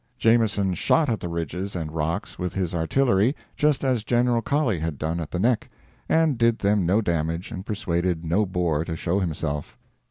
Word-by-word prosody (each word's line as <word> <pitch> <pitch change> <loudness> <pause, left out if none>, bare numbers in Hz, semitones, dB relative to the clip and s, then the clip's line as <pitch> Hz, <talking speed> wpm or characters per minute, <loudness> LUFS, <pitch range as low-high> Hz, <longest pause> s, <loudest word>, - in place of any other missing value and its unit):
Jameson 110 -4 +3
shot 150 - +2
at 115 - 0
the - - -5
ridges 85 +4 -4
and 80 -3 -3
rocks 80 +5 -3
with 90 -1 -3
his 90 -3 -1
artillery, 105 - +2 0.2
just 150 -2 +2
as 125 -5 +1
General 120 0 +2
Colley 130 - 0
had 80 -2 -3
done 80 +4 -2
at 80 - -5
the - - -3
Nek; 115 +4 +1 0.4
and 160 -6 +3
did 115 -1 +3
them 100 -3 +1
no 100 +5 +3
damage 85 -2 -2
and 95 - -5
persuaded 85 -4 -1
no 90 +7 +2
Boer 85 -4 0
to 80 -1 -4
show 90 +4 0
himself. 80 -5 -3
95 Hz, 185 wpm, -24 LUFS, 85-115 Hz, 0.4 s, Jameson